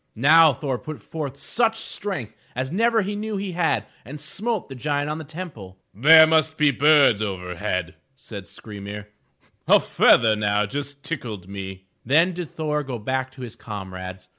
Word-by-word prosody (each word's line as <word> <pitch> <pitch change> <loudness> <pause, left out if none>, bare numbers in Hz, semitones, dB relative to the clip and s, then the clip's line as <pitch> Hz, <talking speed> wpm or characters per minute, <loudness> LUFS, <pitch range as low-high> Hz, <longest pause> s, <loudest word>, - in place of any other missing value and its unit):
*' - - -48
Now 155 +6 +6
Thor 130 -1 -3
put 155 -1 -8
forth 145 -4 -6
such 225 +8 0
strength 190 - -4 0.2
as 130 +2 -3
never 225 +3 +2
he 205 +2 -3
knew 215 0 -4
he 195 -1 -4
had, 160 - 0 0.2
and 150 +4 -9
smote 210 +8 -3
the 135 - -9
giant 145 +2 -2
on 155 - -4
the - - -6
temple. 145 - -9
* - - -49
There 160 +9 +8
must 160 0 +2
be 150 -1 +4
birds 140 -5 +4
over 90 -4 -4
head, 85 -1 -3 0.2
said 105 -7 -10
Skry 105 -1 -11
'mir. 105 +1 -8 0.6
A - - +7
feather 110 -2 +4 0.3
just 140 +5 -5
now - - -36
tickled 110 - -5
me. 95 -1 -8 0.2
Then 165 +9 +3
did 175 -2 -6
Thor 150 -1 -2
go 130 -4 -5
back 130 +4 -2
to 130 - -12
his 120 -3 -7
comrades. 95 -3 -8
140 Hz, 185 wpm, -23 LUFS, 105-160 Hz, 0.6 s, There